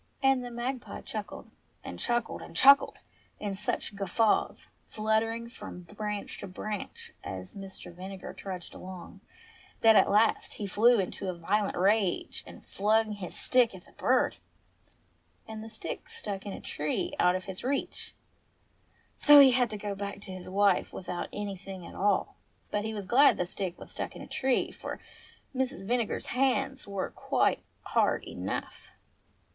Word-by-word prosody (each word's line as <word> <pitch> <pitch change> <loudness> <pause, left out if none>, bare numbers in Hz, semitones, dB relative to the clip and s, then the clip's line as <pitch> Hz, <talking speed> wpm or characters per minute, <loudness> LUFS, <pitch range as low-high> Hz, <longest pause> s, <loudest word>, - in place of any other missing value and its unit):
And 270 -1 +4
the 245 - -5
magpie 240 +2 -4
chuckled, - - -7 0.3
and - - -7
chuckled, 240 -1 -1
and - - -11
chuckled 275 +1 +7 0.4
in 205 -2 -2
such 205 +1 -2
guffaws, 205 +2 +1 0.2
fluttering 220 +2 0
from 235 -6 -9
branch 210 +4 -5
to - - -6
branch 205 +2 -6
as 95 -1 -6
Mr. 195 -3 -9
Vinegar 190 +2 -7
trudged 185 -3 -7
along, 185 -1 -9 0.6
that 225 -1 +7
at - - +6
last 215 +2 +3
he 210 - -4
flew 230 +5 +5
into 190 0 -2
a 180 - -4
violent 200 +4 0
rage 195 0 +1
and - - -12
flung 215 +2 +2
his 200 -4 -6
stick 245 -5 +3
at 180 - -12
the - - -19
bird. - - +2 1.1
And 220 -1 -6
the 225 - -8
stick 220 - -6
stuck 200 -1 -5
in 200 - -4
a - - -7
tree 150 +1 -2
out 180 +1 +5
of 185 - -3
his 190 -1 -7
reach; 275 +2 -2 1.0
so 295 -1 +8
he 275 -2 +9
had 245 -1 +3
to 215 - -4
go 205 0 -3
back 200 0 -5
to 190 - -9
his 185 -1 -7
wife 200 0 +3
without 180 -1 -5
any 205 -1 -4
thing 190 -1 -9
at - - -10
all. 200 0 +1 0.3
But 210 0 0
he 220 - -2
was 205 -2 -4
glad 260 +9 +6
the 180 - 0
stick 180 0 -4
had - - -10
stuck - - -5
in - - -8
a - - -10
tree, 260 -1 +1
for - - -6 0.6
Mrs. 255 -7 -1
Vinegar's 240 -1 0
hands 270 0 +1
were 200 -1 -3
quite - - +1 0.2
hard - - +2
enough. - - -5
205 Hz, 165 wpm, -30 LUFS, 190-235 Hz, 1.1 s, he